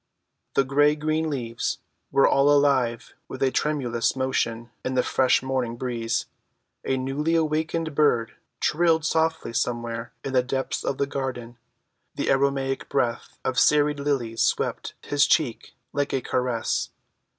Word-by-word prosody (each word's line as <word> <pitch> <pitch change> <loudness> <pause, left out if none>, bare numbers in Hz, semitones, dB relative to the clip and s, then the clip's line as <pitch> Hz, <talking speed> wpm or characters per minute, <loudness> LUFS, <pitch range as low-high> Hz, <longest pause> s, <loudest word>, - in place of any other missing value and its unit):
The 135 - +3
gray‐green 150 +3 +2
leaves 120 -6 -2 0.3
were 135 0 +4
all 140 +1 +4
alive 135 -5 +2
with 130 - -4
a 130 - +3
tremulous 125 -7 0
motion 120 -3 -1
in 130 - -2
the 125 - +3
fresh 130 0 +2
morning 130 -3 -1
breeze; 115 -3 -2 0.6
a 135 - 0
newly‐awakened 155 +3 0
bird 130 -6 +2 0.3
trilled 165 -1 +2
softly 160 -5 0
somewhere 115 -1 -2
in 135 - -4
the 130 - +4
depths 130 +2 -3
of 135 - -2
the 140 - +1
garden; 125 -4 -5 0.6
the - - 0
aromatic 135 0 0
breath 120 -4 -1
of 130 -1 +1
serried 150 -1 +3
lilies 130 -6 -1
swept - - 0
his 145 0 +2
cheek 130 -8 0 0.2
like 145 0 -1
a 135 - +1
caress. 125 -3 -1
135 Hz, 135 wpm, -25 LUFS, 120-145 Hz, 0.6 s, were